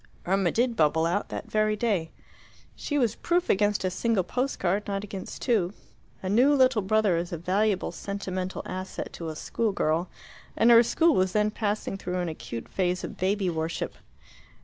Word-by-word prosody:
Irma 190 0 +2
did 240 0 +1
bubble 160 -1 +3
out, 175 +5 -1
that - - -6
very 215 0 +2
day. 205 -7 0 0.7
She 290 - -2
was 235 -6 +2
proof 350 +6 +1
against 205 +1 +1
a 185 - 0
single 210 +1 +1
post 255 +8 -2
card, 195 +4 0
not 200 0 -2
against 195 -2 -7
two. 210 -7 +1 0.5
A - - -3
new 250 +9 +4
little 260 -4 +4
brother 205 -2 +2
is 170 +1 -3
a 170 - -3
valuable 190 +4 0
sentimental 190 -2 -4
asset 185 +1 -5
to 165 -1 -5
a 155 - -6
school 225 +7 -1
girl, 165 +1 0 0.5
and 235 - +5
her 230 0 +9
school 325 +7 +3
was 185 -4 +1
then 210 0 +2
passing 210 -2 -2
through 180 -1 -4
an 175 -1 -1
acute 115 -7 -7
phase 180 -1 -1
of - - -6
baby 195 +1 0
worship. 160 -1 -2
195 Hz, 180 wpm, -27 LUFS, 180-220 Hz, 0.7 s, her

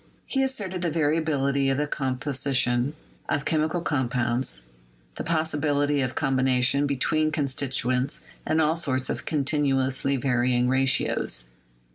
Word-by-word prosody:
He 270 - -1
asserted 205 -9 -2
the 175 - 0
variability 145 -3 +1
of 135 - +1
the 150 - +1
composition 130 -1 0 0.3
of 145 - -1
chemical 160 +2 0
compounds, 120 - -1 0.5
the - - -5
possibility 145 -3 0
of 130 -1 -2
combination 130 +1 +2
be 140 - -1
tween 155 +4 +1
constituents 130 -2 0 0.3
in 155 - +2
all 160 0 +3
sorts 130 -6 -1
of - - -5
continuously 140 -2 +1
varying 125 -1 +1
ratios. 130 - +1
140 Hz, 120 wpm, -25 LUFS, 130-155 Hz, 0.5 s, all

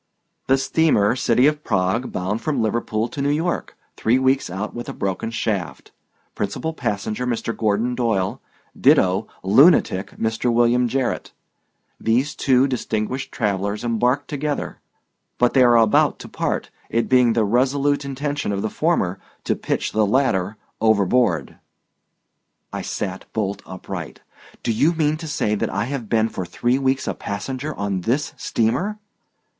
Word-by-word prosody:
"The 135 - +4
steamer 135 -6 +2
City 125 0 +3
of 150 0 +2
Prague, 95 +7 0
bound 95 +5 -2
from 150 -4 -1
Liverpool 110 0 0
to 140 - -5
New 140 - +1
York, 165 +4 -1 0.2
three 115 +3 +2
weeks 130 -2 +2
out 95 +4 -4
with 120 - -6
a - - -4
broken 95 +3 -2
shaft. 105 -5 -3 0.4
Principal 105 +11 -3
passenger, 105 -1 -3
Mr. 115 -1 -2
Gordon 110 +3 0
Doyle; 115 -7 -1 0.3
ditto 95 +3 +3 0.2
lunatic, 100 - +4
Mr. 110 +2 0
William 120 +1 +3
Jarrett. 130 +1 -2 0.7
These 125 +6 +1
two 130 -1 +3
distinguished 125 -1 -2
travelers 100 -1 -1
embarked 125 +4 +1
together, 145 0 -3 0.6
but 125 0 +3
they 135 - +5
are 120 -1 +6
about 110 -2 +4
to - - -9
part, - - -3 0.2
it 115 0 0
being 125 -2 +4
the 110 -2 +2
resolute 135 +6 +1
intention 140 -2 -3
of 100 0 -2
the 110 - -2
former 150 - 0 0.2
to - - 0
pitch - - -2
the 110 - +2
latter 105 -5 +1 0.2
overboard." 105 - +2 1.2
I - - -3
sat 95 0 -5
bolt 100 -2 -2
upright. 95 -2 -7 0.4
"Do - - 0
you 145 +10 +3
mean 155 -2 +1
to 160 0 -7
say 105 -8 0
that 105 - -1
I 100 +2 -1
have 130 -4 -5
been 110 -1 +3
for 95 - -5
three 120 +8 0
weeks 135 0 0
a - - 0
passenger 130 +8 -5
on 100 -2 -2
this 130 +10 -1
steamer?" 175 - -1
115 Hz, 150 wpm, -22 LUFS, 105-135 Hz, 1.2 s, are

